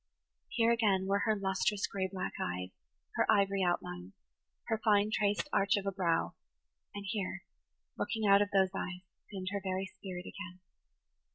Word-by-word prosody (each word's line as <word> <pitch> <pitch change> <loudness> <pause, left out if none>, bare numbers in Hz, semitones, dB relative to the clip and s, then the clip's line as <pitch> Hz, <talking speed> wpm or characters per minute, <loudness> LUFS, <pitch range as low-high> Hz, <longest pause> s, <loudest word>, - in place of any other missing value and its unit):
Here 230 -1 +3
again 205 -5 +3
were 200 +1 +1
her 220 - +4
lustrous 195 +1 0
gray 190 -1 -2
black 185 -1 -4
eyes, 90 +1 -3 0.5
her - - +4
ivory 200 -2 +3
outlines, 95 - -1 0.5
her 220 -1 -1
fine 210 -1 +4
traced 205 +5 +1
arch 200 -1 +3
of 195 -1 -2
brow; 170 -4 +1 0.6
and 200 0 -5
here, 195 -2 -3 0.6
looking 220 -2 -1
out 200 0 +7
of 205 - +1
those 190 -2 +3
eyes, 180 -1 -4 0.3
seemed 190 -2 -4
her 200 -1 -2
very 190 0 -1
spirit 190 -1 -8
again. 185 -3 -8
195 Hz, 155 wpm, -33 LUFS, 185-205 Hz, 0.6 s, out